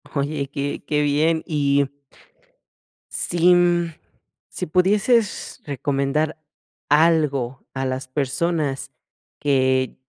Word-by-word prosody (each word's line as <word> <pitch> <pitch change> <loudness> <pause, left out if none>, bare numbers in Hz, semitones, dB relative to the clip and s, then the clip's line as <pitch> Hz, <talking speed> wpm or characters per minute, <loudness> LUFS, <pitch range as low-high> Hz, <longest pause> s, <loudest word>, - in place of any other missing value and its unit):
Oye, 140 0 -1
que 140 0 -3
qué 150 0 +1
bien, 155 +3 +2
y 140 -3 +2 1.3
si, 175 +1 +3
mm, 175 -1 +2 0.6
si - - -5
pudieses 205 +6 +1
recomendar 140 +2 -1 0.5
algo 150 -5 +2
a 135 0 -2
las 130 0 -3
personas 140 +2 -1 0.5
que 130 -2 +1
145 Hz, 90 wpm, -22 LUFS, 135-165 Hz, 1.3 s, si